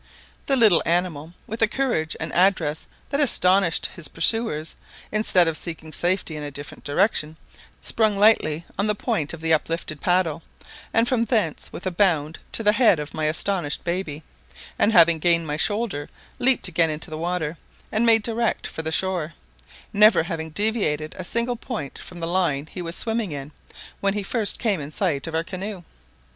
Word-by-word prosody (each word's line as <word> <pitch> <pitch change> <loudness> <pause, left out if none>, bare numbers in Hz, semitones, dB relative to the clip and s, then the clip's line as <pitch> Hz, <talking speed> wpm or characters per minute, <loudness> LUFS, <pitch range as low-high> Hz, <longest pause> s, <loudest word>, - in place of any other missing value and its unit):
The 275 - +3
little 220 -9 +5
animal, 170 -2 -1
with 225 +2 -6
a 225 - +5
courage 215 -12 -1
and 165 - -5
address 170 -5 +2 0.2
that 280 - 0
astonished 190 - +4
his 170 -6 -4
pursuers, 165 -1 0 0.4
instead 200 -5 +4
of 165 - 0
seeking 160 -1 -6
safety 175 -2 0
in 150 - -6
a 145 - -5
different 145 +1 -9
direction, 155 -1 0 0.5
sprung 215 -3 +1
lightly 170 -7 +3
on 200 - +1
the 210 - +1
point 155 -6 -2
of 165 - -9
the 160 0 +1
uplifted 155 -1 -2
paddle, 175 -3 +1 0.5
and 230 +1 +3
from 240 -2 +1
thence 215 - -1
with - - -8
a 185 - 0
bound 170 -4 +1
to 225 - -1
the 210 - +5
head 215 -6 +4
of 150 0 -6
my 155 - -2
astonished 160 0 -1
baby, 170 -4 -3 0.6
and 215 - +4
having 170 -4 +6
gained 170 0 +2
my 150 -1 -3
shoulder, 205 -4 -1 0.3
leaped 255 -4 +4
again 165 -2 +2
into 155 +2 -5
the - - -4
water, 170 -2 -2 0.3
and 220 +2 +1
made 225 -2 +4
direct 230 0 -1
for - - -4
the 160 0 -3
shore, 170 -2 0 0.6
never 210 -4 +6
having 160 -2 -4
deviated 155 -5 0
a 185 - -6
single 235 +6 -1
point 225 - -6
from 180 - -10
the 165 - -3
line 170 -6 0
he 185 - -6
was 170 0 -4
swimming 225 -5 -1
in 140 0 -6 0.5
when 200 0 0
he 205 - -2
first 215 +1 0
came 205 -9 0
in 140 - -6
sight 155 -4 -1
of 160 - -4
our 165 - +1
canoe. 190 +1 -6
175 Hz, 180 wpm, -23 LUFS, 155-210 Hz, 0.6 s, having